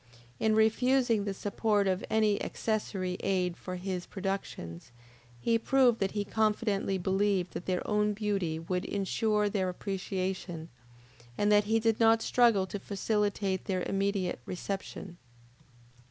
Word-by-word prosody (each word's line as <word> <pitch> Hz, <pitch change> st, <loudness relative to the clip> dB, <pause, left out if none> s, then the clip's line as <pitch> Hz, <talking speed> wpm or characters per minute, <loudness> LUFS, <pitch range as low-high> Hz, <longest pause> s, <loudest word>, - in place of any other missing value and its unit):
In 220 Hz, -1 st, +2 dB
refusing 230 Hz, 0 st, +3 dB
the 200 Hz, -, -2 dB
support 205 Hz, +1 st, +1 dB
of 185 Hz, 0 st, 0 dB
any 215 Hz, -2 st, +2 dB
accessory 195 Hz, -4 st, -2 dB
aid 180 Hz, -3 st, 0 dB
for 185 Hz, +1 st, -6 dB
his 180 Hz, -1 st, -4 dB
productions, 190 Hz, -, -5 dB, 0.5 s
he 230 Hz, -, +2 dB
proved 250 Hz, -1 st, +3 dB
that 195 Hz, -1 st, 0 dB
he 205 Hz, -1 st, -1 dB
confidently 210 Hz, -2 st, 0 dB
believed 190 Hz, -1 st, 0 dB
that 175 Hz, -, -6 dB
their 180 Hz, -1 st, -1 dB
own 210 Hz, 0 st, +2 dB
beauty 200 Hz, -6 st, -1 dB
would 180 Hz, +3 st, -2 dB
ensure 210 Hz, +1 st, 0 dB
their 195 Hz, -2 st, 0 dB
appreciation, 185 Hz, -3 st, -4 dB, 0.7 s
and 205 Hz, 0 st, +2 dB
that 205 Hz, 0 st, +5 dB
he 225 Hz, +2 st, +2 dB
did 225 Hz, -1 st, +1 dB
not 225 Hz, 0 st, +5 dB
struggle 230 Hz, -6 st, +4 dB
to 200 Hz, +2 st, -5 dB
facilitate 200 Hz, -1 st, -1 dB
their 185 Hz, -2 st, -1 dB
immediate 195 Hz, -3 st, -1 dB
reception. 190 Hz, -1 st, -5 dB
200 Hz, 135 wpm, -30 LUFS, 185-215 Hz, 0.7 s, that